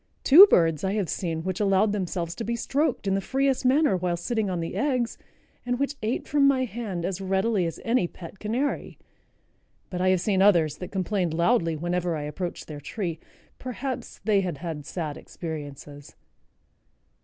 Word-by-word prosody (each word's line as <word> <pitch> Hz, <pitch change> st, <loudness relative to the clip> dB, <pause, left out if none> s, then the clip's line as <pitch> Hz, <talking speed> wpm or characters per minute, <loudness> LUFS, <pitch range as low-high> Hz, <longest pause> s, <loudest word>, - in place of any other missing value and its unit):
Two 355 Hz, +9 st, +10 dB
birds 165 Hz, -, +3 dB
I 190 Hz, 0 st, 0 dB
have 205 Hz, -5 st, -1 dB
seen 165 Hz, -3 st, -2 dB
which 185 Hz, 0 st, -3 dB
allowed 200 Hz, 0 st, +3 dB
themselves 180 Hz, -4 st, -2 dB
to 230 Hz, -, -5 dB
be 235 Hz, +1 st, -1 dB
stroked 280 Hz, +1 st, -1 dB
in 195 Hz, -, +1 dB
the 195 Hz, -, +1 dB
freest 270 Hz, +3 st, 0 dB
manner 270 Hz, -4 st, +4 dB
while 180 Hz, -1 st, -1 dB
sitting 210 Hz, +4 st, -1 dB
on 180 Hz, -2 st, -2 dB
the 165 Hz, -, -4 dB
eggs, 255 Hz, -5 st, 0 dB, 0.5 s
and 245 Hz, 0 st, -1 dB
which 280 Hz, +1 st, -1 dB
ate 225 Hz, +3 st, -2 dB
from 285 Hz, -1 st, +4 dB
my 260 Hz, -2 st, +3 dB
hand 210 Hz, -7 st, -4 dB
as 190 Hz, +1 st, -3 dB
readily 190 Hz, 0 st, +1 dB
as 165 Hz, -, -6 dB
any 230 Hz, -6 st, +2 dB
pet 175 Hz, +3 st, -11 dB
canary; 240 Hz, +7 st, -2 dB, 0.9 s
but 180 Hz, -1 st, -3 dB
I 185 Hz, -, +3 dB
have 185 Hz, -1 st, +3 dB
seen 190 Hz, +1 st, +1 dB
others 165 Hz, -7 st, +4 dB
that 180 Hz, -, -7 dB
complained 185 Hz, -3 st, -1 dB
loudly 170 Hz, -2 st, +2 dB
whenever 175 Hz, +1 st, -1 dB
I 150 Hz, -, -4 dB
approached 175 Hz, +4 st, -5 dB
their 150 Hz, -2 st, -8 dB
tree. 170 Hz, -3 st, -4 dB, 0.4 s
Perhaps 255 Hz, +1 st, -5 dB
they 205 Hz, -2 st, +3 dB
had 180 Hz, -6 st, -3 dB
had 155 Hz, -2 st, -6 dB
sad 155 Hz, -5 st, -4 dB
experiences." 145 Hz, -3 st, -8 dB
190 Hz, 180 wpm, -26 LUFS, 170-230 Hz, 0.9 s, Two